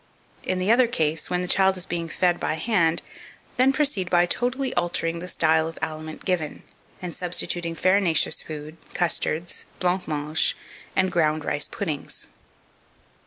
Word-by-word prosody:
In 185 - -1
the 185 +4 +2
other 245 +1 +5
case, 160 -8 0
when 180 0 0
the 180 - -3
child 190 +1 +3
is 180 - -3
being 170 -1 -3
fed 175 +2 +1
by 155 - 0
hand, 165 -2 +2 0.5
then 260 +1 +5
proceed 270 -11 +1
by 175 0 +5
totally 250 +7 0
altering 170 -1 -1
the 180 - -6
style 160 -2 +3
of 165 - -7
aliment 155 0 -5
given, 175 -5 -1 0.4
and 175 -2 -4
substituting 175 -1 -2
farinaceous 185 -2 +3
food, 155 0 -8 0.2
custards, 170 -1 -1
blanc 180 0 +1
mange, 150 +1 0 0.4
and 190 -1 +3
ground 155 -3 +1
rice 145 - -1
puddings. 155 -8 -4
175 Hz, 150 wpm, -25 LUFS, 160-185 Hz, 0.5 s, other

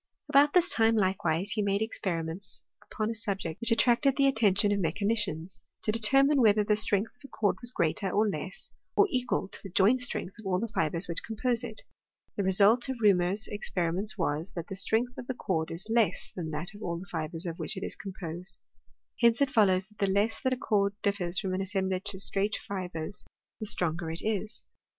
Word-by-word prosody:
About 290 +1 +5
this 360 0 +6
time, 225 - +3
likewise, 185 -2 0
he 215 - 0
made 200 +1 +1
experiments 180 -4 -3 0.3
upon 215 +1 -1
a - - -2
subject 195 -7 -4
which 235 - 0
attracted 240 +3 +3
the 275 - +4
attention 210 -6 +3
of 205 - +1
me 165 -4 +1
chanicians— 200 -4 -2 0.2
to 215 - +1
determine 270 +6 +3
whether 210 -2 +5
the 210 +1 +2
strength 210 0 +1
of - - -34
a - - -9
cord 210 -6 0
was 240 - +1
greater, 190 -2 0
or 210 +4 +2
less, 345 - -5 0.2
or 410 - +6
equal 250 -6 0
to - - -6
the 195 - -8
joint 205 +8 +4
strength 230 -4 -2
of 215 - -8
all 180 -1 +1
the 230 - -2
fibres 165 -1 -1
which 170 0 -3
compose 235 +2 -1
it. 225 -3 -2 0.5
The - - -1
result 200 +6 +4
of 265 - -2
Reaumur's 200 -1 +3
experiments 190 0 -1
was, 155 +5 -2
that 170 -1 -6
the 195 - -4
strength 225 +5 +1
of 245 - -8
the 260 - -3
cord 160 -8 -1
is 170 +5 -6
less 225 -2 +1
than 170 -3 -4
that 155 +6 -4
of 205 - -12
all 170 -4 -3
the 180 - -8
fibres 165 +1 -4
of 170 -1 -5
which - - -3
it 190 - -4
is - - -3
com 195 -2 -7
posed. 175 +1 -5 0.6
Hence 235 -1 +4
it 280 -2 +2
follows, 190 -6 +3
that 210 0 -26
the 200 -1 +1
less 205 +3 +1
that 260 - +1
a - - -13
cord 200 -4 +1
ditfers 185 -3 0
from 190 -3 -2
an 185 - -1
assemblage 190 0 -1
of 190 - -2
straight 205 +1 0
fibres, 185 -2 -5 0.4
the 215 - -3
stronger 170 -3 0
it 165 +1 -4
is. 215 0 -3
200 Hz, 210 wpm, -29 LUFS, 180-225 Hz, 0.6 s, this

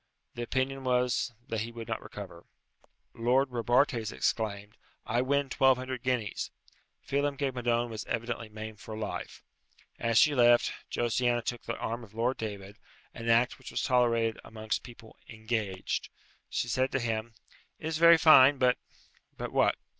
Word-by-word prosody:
The 120 - -6
opinion 130 +2 -1
was 125 0 +1 0.2
that 115 -5 -2
he 115 +2 -4
would 115 -1 -8
not - - -3
recover. 85 0 -10 0.7
Lord 125 +4 +2
Robartes 120 -1 +1
exclaimed, 105 -2 -2 0.3
"I 120 +2 +1
win 140 +2 +1
twelve 135 -1 +4
hundred 130 -1 -5
guineas." 125 -4 -2 0.6
Phelem 140 0 0
ghe 140 -1 0
Madone 120 -1 0
was 110 -2 -5
evidently 115 -1 -3
maimed 110 0 -8
for 110 +3 -8
life. 110 -1 -5 0.6
As 115 -1 +1
she 150 - +6
left, 120 -2 +4 0.2
Josiana 120 0 0
took 120 0 -3
the - - -3
arm 115 +1 -4
of 110 -1 -15
Lord 120 +3 0
David, 100 -2 -6 0.4
an 115 0 -5
act 120 +2 +3
which - - -10
was - - -2
tolerated 115 -3 +2
amongst 110 -1 -3
people 115 -2 -14
"engaged." 110 -4 -3 0.4
She - - -1
said 130 +2 0
to 135 - +1
him, 115 -1 -3 0.4
"It - - -10
is 160 0 -2
very 170 0 +8
fine, 145 -4 +7
but 125 -1 +3 0.3
" - - -36
"But - - -5
what?" - - +3
120 Hz, 160 wpm, -30 LUFS, 110-130 Hz, 0.7 s, very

